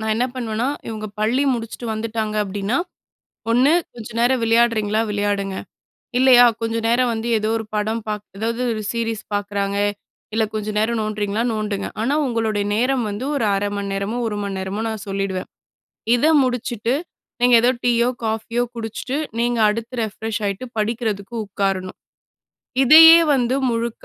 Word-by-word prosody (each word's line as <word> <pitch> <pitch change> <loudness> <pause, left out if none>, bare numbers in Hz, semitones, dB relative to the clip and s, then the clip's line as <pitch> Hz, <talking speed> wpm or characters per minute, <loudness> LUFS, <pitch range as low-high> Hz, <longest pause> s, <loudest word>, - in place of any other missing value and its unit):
நா 220 - -4
என்னா 245 +3 +1
பண்ணுவேனா, 230 +1 -2 0.2
இவங்க 215 -1 -5
பள்ளி 245 +6 +2
முடிச்சுட்டு 230 +1 -6
வந்துட்டாங்க 220 -1 -3
அப்படின்னா 200 +4 -2 0.7
1 255 +6 +4 0.2
கொஞ்ச 230 -3 -8
நேரம் 250 +1 +3
விளையாடுறீங்களா? 225 -2 +2
விளையாடுங்க. 205 -1 -1 0.6
இல்லையா 250 -1 +7 0.2
கொஞ்ச 225 0 -1
நேரம் 245 +1 +2
வந்து 225 +1 -3
ஏதோ 215 +1 -1
ஒரு 220 - -5
படம் 220 +2 -1
பார்க் 210 -1 -4
ஏதாவது 230 +3 -2
ஒரு 215 - -4
சீரிஸ் 230 -2 -3
பார்க்குறாங்க, 200 -1 -2 0.6
இல்ல 220 0 +2
கொஞ்சம் 215 0 -3
நேரம் 225 +1 0
நோண்டுறீங்களா? 215 +1 -1
நோண்டுங்க. 210 -2 -2
ஆனா 250 +6 +1
உங்களுடைய 220 -4 -1
நேரம் 250 +2 +1
வந்து 205 +5 -4
ஒரு 230 - 0
1/2 205 +1 -1
மணி 200 -1 -3
நேரமோ, 200 +4 -2
1 210 - -3
மணி 195 -1 -4
நேரமோ 190 +3 -3
நா 220 - -2
சொல்லிடுவேன். 195 -1 -3 0.7
இத 245 - +1 0.2
முடிச்சுட்டு 245 -1 -1 0.5
நீங்க 245 -1 +6
ஏதோ 245 - +4
டீயோ, 240 -1 +3 0.2
காஃபியோ 225 +2 -1
குடிச்சுட்டு 230 +4 -4 0.2
நீங்க 240 -1 +1
அடுத்து 230 +3 -4
ரெஃப்ரெஷ் 220 +1 -4
ஆயிட்டு, 200 +6 -3
படிக்கிறதுக்கு 220 0 -2
உட்காரணும். 195 -2 -2 0.9
இதையே 325 +4 +10 0.2
வந்து 250 0 +1 0.2
முழுக்க 230 0 -3
220 Hz, 145 wpm, -21 LUFS, 205-235 Hz, 0.9 s, இதையே